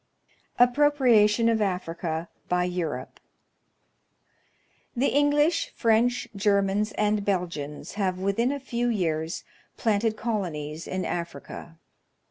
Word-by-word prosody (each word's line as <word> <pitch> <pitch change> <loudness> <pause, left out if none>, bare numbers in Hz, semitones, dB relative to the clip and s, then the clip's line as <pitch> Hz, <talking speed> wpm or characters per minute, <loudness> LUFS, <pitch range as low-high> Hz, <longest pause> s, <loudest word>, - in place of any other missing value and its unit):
Appropriation 245 -4 +4
of 225 -1 +2
Africa 170 -4 -2 0.2
by 180 0 +2
Europe. 180 -3 -4 1.8
The 255 +3 +2
English, 295 +4 +2
French, 235 +2 +2
Germans, 200 +1 +1
and 210 -1 +1
Belgians 170 -7 -3
have 185 -2 0
within 200 +7 0
a 285 - -3
few 245 -2 -2
years 165 -6 -1 0.3
planted 220 0 +1
colonies 165 -9 -3
in 185 0 -3
Africa. 170 0 -6
205 Hz, 100 wpm, -26 LUFS, 180-235 Hz, 1.8 s, Appropriation